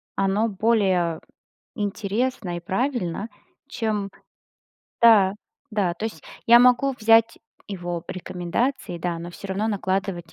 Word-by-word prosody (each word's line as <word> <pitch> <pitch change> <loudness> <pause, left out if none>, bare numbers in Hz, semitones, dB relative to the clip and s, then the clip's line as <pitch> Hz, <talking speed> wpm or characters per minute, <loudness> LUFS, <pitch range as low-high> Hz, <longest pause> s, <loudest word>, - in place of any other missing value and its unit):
оно 195 +3 +1
более 190 -6 +1 0.6
интересно 205 -1 -2
и - - -5
правильно, 210 0 -2 0.4
чем 215 -6 -2 0.9
да, 210 -5 +7 0.4
да, 200 -5 0
то 195 - -6
есть 160 -9 -8 0.2
я 235 +1 +8
могу 250 +3 +4
взять 225 +1 +4 0.3
его 175 -3 -5
рекомендации, 185 +5 -3
да, 170 -1 -3
но 170 +1 -7
всё 200 - -10
равно 195 +3 -1
накладывать 190 -4 -2
200 Hz, 115 wpm, -24 LUFS, 175-225 Hz, 0.9 s, я